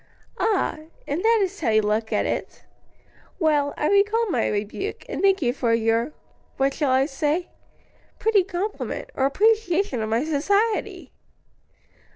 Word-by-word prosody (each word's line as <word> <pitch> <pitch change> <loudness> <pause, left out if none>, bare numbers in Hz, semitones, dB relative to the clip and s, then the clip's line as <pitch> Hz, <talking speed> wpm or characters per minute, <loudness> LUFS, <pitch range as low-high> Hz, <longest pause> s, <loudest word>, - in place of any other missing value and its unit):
"Ah! 405 -7 0 0.3
and 305 +5 -2
that 455 -1 +4
is 390 +1 -4
how 290 - 0
you 215 -1 +3
look 215 +2 -1
at - - +1
it? - - -4 0.7
Well, 300 -5 +2
I 300 - 0
recall 420 +3 +3
my - - +1
rebuke, 210 - -4
and - - -4
thank 390 -3 +3
you 240 -1 +1
for 235 -4 +1
your 230 +4 +1 0.5
what 270 0 +1
shall 290 -2 -1
I 260 +1 +3
say 305 +4 -1 0.7
pretty 430 -3 +3
compliment, 385 +3 -4
or 265 - +1
appreciation 395 - +1
of 215 - -3
my 230 +6 +1
society?" 400 +9 0
310 Hz, 150 wpm, -24 LUFS, 255-400 Hz, 0.7 s, that